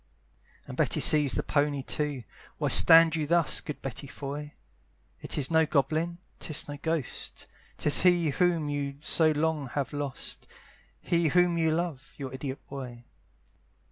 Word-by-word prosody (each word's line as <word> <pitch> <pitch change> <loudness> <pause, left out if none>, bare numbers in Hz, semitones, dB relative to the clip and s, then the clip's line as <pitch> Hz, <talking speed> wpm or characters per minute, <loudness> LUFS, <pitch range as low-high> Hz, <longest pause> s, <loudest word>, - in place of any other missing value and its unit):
And - - -8
Betty - - 0
sees 150 -3 +5
the - - -2
pony 145 -2 -1
too: 145 -3 -3 0.3
Why - - -1
stand 165 0 +8
you 155 -2 -2
thus 170 -2 +2
Good 150 - -8
Betty 135 +1 -6
Foy? 145 +2 -8 0.7
It - - -5
is 145 +1 -1
no 160 -1 +3
goblin, 160 +4 -1 0.2
'tis 155 -1 -3
no 145 0 -7
ghost, 160 -4 -4 0.3
'Tis 150 - +4
he 175 -4 +3
whom 170 -1 0
you 145 -1 -4
so 155 +1 +2
long 155 -2 -1
have 140 +3 -4
lost, 145 -2 -5 0.5
He 170 -1 0
whom 175 +2 +2
you 165 -1 +1
love, 160 -4 -4
your 135 -2 -7
idiot 130 0 -7
boy. 125 -3 -9
150 Hz, 150 wpm, -27 LUFS, 140-165 Hz, 0.7 s, stand